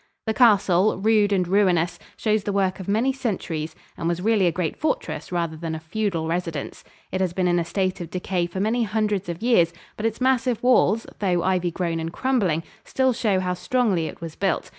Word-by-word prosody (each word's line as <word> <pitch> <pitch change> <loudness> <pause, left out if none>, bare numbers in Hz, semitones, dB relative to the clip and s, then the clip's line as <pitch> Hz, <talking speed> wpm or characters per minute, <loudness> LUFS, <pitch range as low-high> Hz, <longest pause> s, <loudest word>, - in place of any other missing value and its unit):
The 220 - 0
castle, 205 -5 +4
rude 210 0 +3
and 185 -3 +1
ruinous, 175 -3 +2 0.2
shows 215 -2 +1
the 205 - -2
work 195 -1 0
of 190 - -7
many 225 +7 +2
centuries, 175 - -3 0.2
and 165 - -3
was 170 0 0
really 205 -1 +3
a - - +3
great 165 -2 -2
fortress 310 - -3
rather 170 -2 -1
than 160 0 -4
a - - -5
feudal 170 0 -2
residence. 165 -3 -3 0.3
It 190 - -1
has 180 -2 0
been 185 0 +1
in 175 0 +2
a - - 0
state 185 +2 -2
of 170 - -6
decay 180 -1 -1
for 175 +2 -6
many 220 +5 +1
hundreds 210 -3 -1
of 170 +5 -5
years, 200 -9 +4 0.3
but 220 - 0
its 225 - -4
massive 255 -2 +1
walls, 230 -3 +4
though 180 -4 +1
ivy 180 -1 +1
grown 170 -1 -2
and 165 0 -4
crumbling, 195 -10 0 0.2
still 260 -1 +1
show 210 -5 +1
how 180 -1 -1
strongly 195 -4 0
it - - -9
was 165 -2 -7
built. 195 -2 -1
190 Hz, 205 wpm, -24 LUFS, 170-220 Hz, 0.3 s, castle